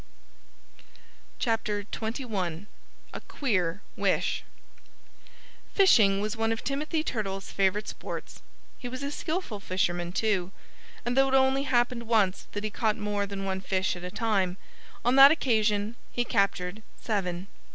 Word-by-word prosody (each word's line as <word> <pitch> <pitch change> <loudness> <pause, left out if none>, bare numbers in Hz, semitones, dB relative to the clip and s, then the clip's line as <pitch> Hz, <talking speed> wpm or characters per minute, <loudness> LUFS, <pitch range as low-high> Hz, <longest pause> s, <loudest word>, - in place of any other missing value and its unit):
XXI 210 - -2 0.5
A - - -6
QUEER 185 - -1
WISH - - 0 1.3
Fishing 215 - +6
was 210 +2 -2
one 225 0 0
of 225 - -3
Timothy 305 +3 -1
Turtle's 195 -8 -3
favorite 200 +2 +1
sports. - - -7 0.4
He 250 - -5
was 255 +3 -6
a 280 - -2
skillful 315 - -3
fisherman, 175 -2 -1
too. 190 -2 0 0.5
And 240 +1 0
though 270 0 +5
it 265 - +2
only 265 +1 +3
happened 240 -1 +1
once 210 -5 +2
that 205 - -3
he 215 - -2
caught 220 0 0
more 205 -1 -1
than 195 -1 -5
one 190 0 -2
fish 190 0 0
at 175 - -9
a 180 - -4
time, 195 -4 0 0.5
on 250 +2 +3
that 275 +1 +11
occasion 220 -7 +1 0.2
he 245 - 0
captured 195 -1 0 0.2
seven. 185 -4 -2
210 Hz, 135 wpm, -28 LUFS, 195-245 Hz, 1.3 s, that